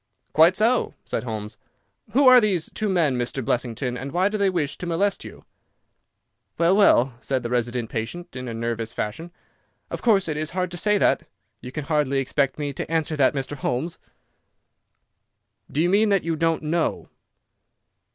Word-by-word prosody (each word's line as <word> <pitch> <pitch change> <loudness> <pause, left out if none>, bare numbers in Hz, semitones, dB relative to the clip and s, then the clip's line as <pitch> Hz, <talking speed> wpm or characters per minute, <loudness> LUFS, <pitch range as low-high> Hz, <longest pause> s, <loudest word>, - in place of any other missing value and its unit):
"Quite 165 +4 +6
so," 230 +5 +1
said - - -3
Holmes. 110 -1 -5 0.6
"Who 270 +2 +5
are 255 -1 +9
these 190 -7 0
two 215 -1 -2
men 155 -9 +1
Mr. 125 +1 -3
Blessington, 125 +1 -1
and 135 +2 -6
why 185 +4 +2
do 215 - -2
they 200 -1 +3
wish 150 -6 -1
to 180 - -5
molest 190 +4 0
you?" - - -12 1.1
"Well, 170 +3 +4
well," 135 - +4
said 130 -2 -2
the 120 - -4
resident 120 -1 -1
patient, 150 +10 -5
in 125 0 -5
a 115 - -4
nervous 115 0 -3
fashion, 140 +12 -4 0.6
"of - - -4
course 200 -6 +3
it 155 -2 -2
is 155 0 -2
hard 180 -1 -1
to 175 - -5
say 210 +4 +2
that. - - +2 0.3
You 125 - -9
can 150 +1 -5
hardly 150 -3 +1
expect 135 0 0
me 145 -2 -3
to 145 - -5
answer 160 -1 0
that, 140 -1 +3
Mr. 135 +1 -3
Holmes." 135 +5 -3 1.7
"Do 155 - +1
you 175 - +2
mean 210 +3 +3
that 200 -2 +2
you 165 -1 -1
don't 165 0 0
know?" 160 +2 -1
155 Hz, 180 wpm, -24 LUFS, 125-180 Hz, 1.7 s, are